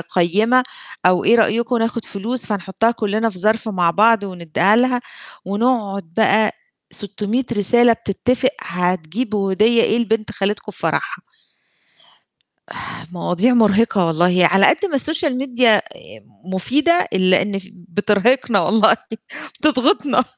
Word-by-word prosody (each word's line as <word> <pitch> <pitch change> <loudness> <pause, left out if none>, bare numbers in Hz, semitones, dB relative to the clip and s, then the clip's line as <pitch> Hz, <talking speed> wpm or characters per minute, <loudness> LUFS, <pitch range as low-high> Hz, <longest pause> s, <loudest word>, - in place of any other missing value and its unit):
قيّمة 205 +10 +1 0.4
أو 180 0 +2
إيه 230 - +4
رأيكم 235 +2 +1
ناخد 230 0 -2
فلوس 230 +5 -4
فنحطّها 205 +2 -1
كلّنا 220 0 -2
في 185 - -9
ظَرف 220 +4 0
مع 180 -5 0
بعض 220 +3 +3
وندّيها 185 +2 0
لها، 250 0 +1 0.5
ونقعد 200 -4 -2
بقى 220 -1 +3 0.4
600 210 +4 -3
رسالة 235 +3 +3
بتتفق 250 +4 -1
هتجيبوا 185 +4 -2
هدية 230 +4 +3
إيه 225 - +1
لبنت 225 -2 -2
خالتكم 205 +1 -4
في - - -18
فَرَحها. - - -3 1.9
مواضيع 180 +7 0
مرهقة 215 -3 +2
والله، 175 +2 +2
على 195 +3 +4
قد 340 +6 +2
ما 285 -7 -1
الSocial 295 -3 0
media 240 -4 +3 0.6
مفيدة 285 - +1
إلّا 185 0 +3
إن 195 0 -3
ف 195 0 -13
بترهقنا 205 +5 0
والله 220 +5 +4 0.7
بتضغطنا. 280 -2 +2
215 Hz, 120 wpm, -18 LUFS, 190-240 Hz, 1.9 s, إيه